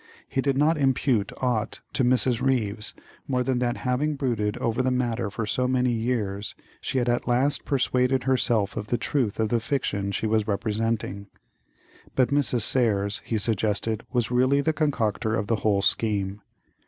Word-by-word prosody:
He 135 Hz, -, -1 dB
did 135 Hz, -1 st, 0 dB
not 150 Hz, +2 st, +3 dB
impute 130 Hz, -6 st, +1 dB
aught 120 Hz, -4 st, -1 dB
to 130 Hz, -, +1 dB
Mrs. 125 Hz, -1 st, +2 dB
Ryves 115 Hz, -5 st, 0 dB, 0.3 s
more 125 Hz, -2 st, +1 dB
than 130 Hz, -1 st, 0 dB
that 120 Hz, -1 st, 0 dB
having 140 Hz, +4 st, 0 dB
brooded 115 Hz, -7 st, -1 dB
over 115 Hz, +2 st, 0 dB
the 130 Hz, -, +1 dB
matter 120 Hz, -3 st, -1 dB
for 110 Hz, +2 st, -3 dB
so 125 Hz, +4 st, 0 dB
many 125 Hz, -1 st, +2 dB
years 110 Hz, -4 st, -2 dB, 0.3 s
she -, -, -2 dB
had 125 Hz, -1 st, +1 dB
at 120 Hz, 0 st, 0 dB
last 130 Hz, +4 st, +1 dB
persuaded 130 Hz, -2 st, +1 dB
herself 120 Hz, -6 st, +1 dB
of 105 Hz, -1 st, -4 dB
the 120 Hz, -, 0 dB
truth 120 Hz, -8 st, -1 dB
of 110 Hz, -1 st, +1 dB
the 120 Hz, -, +2 dB
fiction 105 Hz, -6 st, -1 dB
she 105 Hz, -, -2 dB
was 110 Hz, -1 st, +1 dB
representing; 105 Hz, -1 st, -2 dB, 0.9 s
but 130 Hz, -2 st, +3 dB
Mrs. 140 Hz, -4 st, +1 dB
Serres, 105 Hz, -5 st, +2 dB
he 115 Hz, -, -1 dB
suggested, 110 Hz, +1 st, 0 dB
was 120 Hz, -2 st, 0 dB
really 130 Hz, +3 st, +3 dB
the 160 Hz, +3 st, +1 dB
concocter 115 Hz, -7 st, 0 dB
of 105 Hz, -, -1 dB
the 115 Hz, +1 st, 0 dB
whole 100 Hz, -2 st, +1 dB
scheme. 100 Hz, -2 st, 0 dB
120 Hz, 170 wpm, -25 LUFS, 105-130 Hz, 0.9 s, not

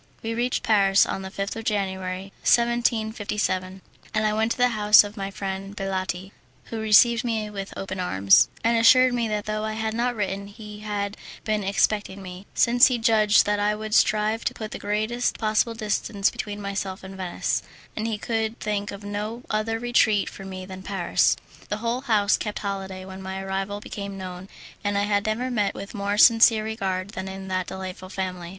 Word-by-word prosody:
We 225 Hz, 0 st, -2 dB
reached 245 Hz, +2 st, -1 dB
Paris 195 Hz, -2 st, +4 dB
on -, -, -3 dB
the 190 Hz, -, -6 dB
5th 195 Hz, +1 st, -4 dB
of 225 Hz, -, -6 dB
January, 190 Hz, -2 st, -2 dB
1757, 220 Hz, -5 st, 0 dB, 0.3 s
and 215 Hz, 0 st, +2 dB
I 215 Hz, -, +2 dB
went 220 Hz, +1 st, +1 dB
to -, -, -12 dB
the 250 Hz, 0 st, +4 dB
house 210 Hz, -2 st, +6 dB
of 205 Hz, 0 st, -8 dB
my 195 Hz, -2 st, -4 dB
friend 195 Hz, 0 st, -5 dB
Baletti, 190 Hz, -1 st, -3 dB, 0.4 s
who 225 Hz, -, -3 dB
received 230 Hz, +2 st, +5 dB
me 220 Hz, -3 st, -2 dB
with 195 Hz, -1 st, -6 dB
open 190 Hz, -1 st, -5 dB
arms, 100 Hz, -, +4 dB
and 230 Hz, +1 st, +3 dB
assured 255 Hz, +2 st, +6 dB
me 235 Hz, -2 st, 0 dB
that 210 Hz, -1 st, -2 dB
though 215 Hz, 0 st, -2 dB
I 215 Hz, 0 st, -2 dB
had 220 Hz, 0 st, -2 dB
not 240 Hz, +2 st, 0 dB
written 200 Hz, -1 st, -3 dB
he 210 Hz, 0 st, -10 dB
had 205 Hz, -1 st, -3 dB, 0.3 s
been 215 Hz, -1 st, 0 dB
expecting 200 Hz, 0 st, 0 dB
me, 185 Hz, +1 st, -9 dB
since 245 Hz, +2 st, +6 dB
he 250 Hz, -2 st, 0 dB
judged 220 Hz, -2 st, +4 dB
that 205 Hz, 0 st, +1 dB
I 210 Hz, +1 st, +1 dB
would 215 Hz, 0 st, -6 dB
strive 215 Hz, +1 st, +3 dB
to -, -, -1 dB
put 215 Hz, -1 st, -6 dB
the -, -, -6 dB
greatest 215 Hz, +4 st, -1 dB
possible 220 Hz, +1 st, +1 dB
distance 210 Hz, -2 st, 0 dB
between 205 Hz, -1 st, -5 dB
myself 200 Hz, -1 st, -4 dB
and 190 Hz, 0 st, -9 dB
Venice, 185 Hz, -2 st, -2 dB, 0.3 s
and 220 Hz, +1 st, -2 dB
he 220 Hz, -2 st, -2 dB
could 225 Hz, +1 st, -2 dB
think 205 Hz, -1 st, -2 dB
of 200 Hz, +1 st, -9 dB
no 210 Hz, +4 st, -4 dB
other 215 Hz, +1 st, 0 dB
retreat 225 Hz, -3 st, +2 dB
for 195 Hz, -, -10 dB
me 185 Hz, -1 st, -7 dB
than 190 Hz, 0 st, -9 dB
Paris. 190 Hz, -2 st, +1 dB, 0.3 s
The 210 Hz, -, -1 dB
whole 235 Hz, +3 st, -2 dB
house 215 Hz, -6 st, +2 dB
kept 210 Hz, -1 st, -4 dB
holiday 195 Hz, -2 st, -5 dB
when 190 Hz, 0 st, -9 dB
my 190 Hz, 0 st, -5 dB
arrival 195 Hz, +1 st, -3 dB
became 200 Hz, -1 st, -7 dB
known, 185 Hz, 0 st, -7 dB, 0.3 s
and 205 Hz, -1 st, 0 dB
I 200 Hz, -, +2 dB
have 205 Hz, 0 st, +1 dB
never 245 Hz, +4 st, -1 dB
met 210 Hz, -4 st, 0 dB
with 200 Hz, -, -8 dB
more 205 Hz, -1 st, -2 dB
sincere 225 Hz, -1 st, +6 dB
regard 195 Hz, -3 st, -3 dB
than 190 Hz, -1 st, -5 dB
in 190 Hz, 0 st, -7 dB
that 185 Hz, -1 st, -1 dB
delightful 185 Hz, 0 st, -7 dB
family. 180 Hz, -3 st, -4 dB
205 Hz, 195 wpm, -25 LUFS, 195-220 Hz, 0.4 s, house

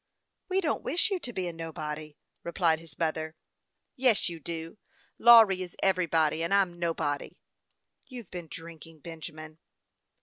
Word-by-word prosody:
" -, -, -53 dB
We 380 Hz, +1 st, +2 dB
don't 310 Hz, -5 st, 0 dB
wish 355 Hz, +9 st, +1 dB
you 385 Hz, -, 0 dB
to 250 Hz, -, -5 dB
be 190 Hz, -5 st, -3 dB
a 170 Hz, -, -4 dB
nobody," 155 Hz, -2 st, -6 dB, 0.3 s
replied 170 Hz, -2 st, +1 dB
his 165 Hz, -4 st, -16 dB
mother. 160 Hz, -1 st, -2 dB, 0.3 s
" -, -, -54 dB, 0.3 s
Yes, 250 Hz, -8 st, +3 dB
you 170 Hz, -1 st, -7 dB
do; 165 Hz, +4 st, -6 dB, 0.4 s
Lawry 225 Hz, -5 st, +8 dB
is 180 Hz, -2 st, -7 dB
everybody, 165 Hz, -5 st, +2 dB
and 170 Hz, -, -1 dB
I'm 180 Hz, -3 st, +2 dB
nobody." 160 Hz, -4 st, -2 dB, 0.3 s
" -, -, -46 dB
You've 245 Hz, -7 st, -9 dB
been 175 Hz, -2 st, -6 dB
drinking, 165 Hz, -1 st, -11 dB
Benjamin." 155 Hz, -1 st, -9 dB
170 Hz, 160 wpm, -29 LUFS, 160-195 Hz, 0.4 s, Lawry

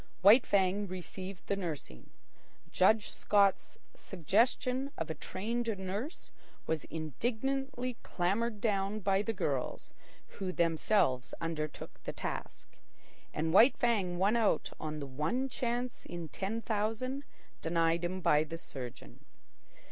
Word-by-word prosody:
White 215 Hz, +6 st, +8 dB
Fang 200 Hz, +1 st, +2 dB
received 185 Hz, +1 st, -6 dB
the 200 Hz, -, 0 dB
nursing. 160 Hz, -, -6 dB, 0.6 s
Judge 210 Hz, +3 st, +4 dB
Scott's 200 Hz, -2 st, +2 dB, 0.2 s
suggestion 250 Hz, -, +1 dB
of -, -, -2 dB
a -, -, -1 dB
trained 230 Hz, +8 st, -3 dB
nurse 200 Hz, -, -5 dB, 0.3 s
was 160 Hz, -2 st, -1 dB
indignantly 245 Hz, -, -2 dB
clamoured 205 Hz, +5 st, 0 dB
down 205 Hz, -1 st, 0 dB
by 195 Hz, 0 st, +3 dB
the 225 Hz, -, -1 dB
girls, 140 Hz, -, -2 dB, 0.5 s
who 190 Hz, -2 st, -1 dB
themselves 165 Hz, -6 st, +2 dB
undertook 155 Hz, -3 st, -4 dB
the -, -, -4 dB
task. -, -, -6 dB, 0.5 s
And 160 Hz, +1 st, -1 dB
White 230 Hz, +8 st, +7 dB
Fang 200 Hz, -7 st, +1 dB
won 200 Hz, +5 st, +3 dB
out 220 Hz, -8 st, +2 dB
on 155 Hz, 0 st, -4 dB
the 140 Hz, -, -4 dB
one 155 Hz, -, -1 dB
chance 245 Hz, 0 st, -3 dB
in 170 Hz, -2 st, -6 dB
ten 215 Hz, +7 st, -3 dB
thousand 225 Hz, +6 st, -1 dB, 0.4 s
denied 165 Hz, 0 st, +2 dB
him 185 Hz, +2 st, -2 dB
by 155 Hz, -3 st, +4 dB
the 165 Hz, +1 st, -6 dB
surgeon. 125 Hz, -, -8 dB
195 Hz, 125 wpm, -33 LUFS, 165-230 Hz, 0.6 s, White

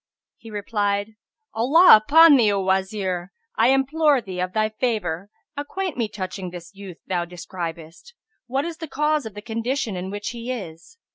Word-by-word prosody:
He 225 Hz, -, -12 dB
replied, 205 Hz, 0 st, -2 dB, 0.4 s
"Allah 275 Hz, +8 st, +7 dB
upon 300 Hz, +8 st, +7 dB
thee, 225 Hz, -6 st, +4 dB
O 200 Hz, -, 0 dB
Wazir, 190 Hz, -1 st, -1 dB, 0.2 s
I -, -, +3 dB
implore 275 Hz, +2 st, +3 dB
thee, 190 Hz, -6 st, -7 dB
of 180 Hz, 0 st, -2 dB
thy 215 Hz, 0 st, +1 dB
favour, 205 Hz, -6 st, -2 dB, 0.3 s
acquaint 315 Hz, +5 st, -4 dB
me 235 Hz, -3 st, -1 dB
touching 190 Hz, -2 st, -6 dB
this 175 Hz, +1 st, -10 dB
youth 195 Hz, -3 st, -10 dB
thou 175 Hz, -2 st, -1 dB
describest, 170 Hz, -, -8 dB, 0.3 s
what 265 Hz, +4 st, -1 dB
is 335 Hz, -1 st, -5 dB
the 325 Hz, -1 st, -7 dB
cause 300 Hz, -2 st, 0 dB
of 210 Hz, -, -11 dB
the 210 Hz, -, -8 dB
condition 230 Hz, 0 st, -2 dB
in 180 Hz, +1 st, -5 dB
which 205 Hz, +1 st, -4 dB
he 235 Hz, +1 st, -6 dB
is." 195 Hz, -, -8 dB
215 Hz, 165 wpm, -23 LUFS, 185-270 Hz, 0.4 s, Allah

